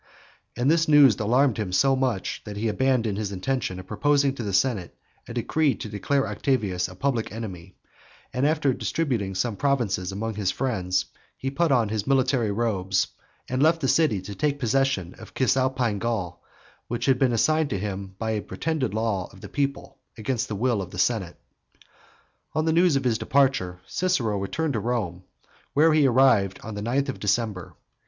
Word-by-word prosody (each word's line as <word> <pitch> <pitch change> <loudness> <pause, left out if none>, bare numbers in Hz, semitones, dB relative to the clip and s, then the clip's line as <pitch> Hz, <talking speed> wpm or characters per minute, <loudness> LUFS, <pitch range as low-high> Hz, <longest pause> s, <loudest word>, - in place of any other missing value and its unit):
And 130 +5 +3
this 165 0 +3
news 145 -7 +6
alarmed 125 +3 +2
him 100 -4 -2
so 135 +8 +3
much, 130 -7 -1
that 105 -1 -7
he 110 +2 -1
abandoned 115 -2 +1
his 105 -2 -3
intention 100 -1 -2
of 95 - -9
proposing 140 +6 +2
to 135 - -6
the 105 -3 -3
senate 95 -2 0 0.3
a - - -7
decree 145 +4 +1
to - - -7
declare 135 +7 0
Octavius 100 -10 0
a 90 - -11
public 125 0 -1
enemy, 95 -5 -7 0.6
and 130 +3 +2
after 150 -3 +2
distributing 120 -12 -2
some 110 +3 -1
provinces 110 -9 0
among 110 +3 -3
his 100 -3 -1
friends, 95 -7 -1 0.3
he 135 - -3
put 165 +2 +1
on 120 -5 +3
his 105 -1 -2
military 130 -4 +2
robes, 100 -4 0 0.4
and 130 +1 -1
left 165 +2 +4
the 135 - -1
city 125 - +2
to 100 - -7
take 145 +8 0
possession 135 -8 0
of - - -12
Cisalpine 130 -4 +1
Gaul, 100 -7 -3 0.5
which 120 0 -3
had 130 -2 +3
been 130 -2 +3
assigned 155 +6 +2
to 100 - -1
him 95 -1 -5
by 110 +1 -2
a 105 -1 -1
pretended 130 +4 -2
law 110 -5 -1
of - - -16
the - - -9
people, 140 -1 -3 0.2
against 120 +3 -2
the 105 - -4
will 115 0 +1
of 95 - -6
the - - -10
senate. 100 -8 0 1.2
On 155 0 +1
the 160 - +2
news 170 -2 +4
of 135 - +1
his 115 -4 +1
departure 130 -11 +1
Cicero 125 - 0
returned 145 +10 -2
to 115 - 0
Rome, 100 -6 -3 0.5
where 155 +2 +5
he 150 -3 +5
arrived 120 -7 +3
on 110 - -6
the 105 - -5
ninth 130 +6 0
of 135 - -4
December. 105 -3 -1
115 Hz, 185 wpm, -25 LUFS, 100-135 Hz, 1.2 s, news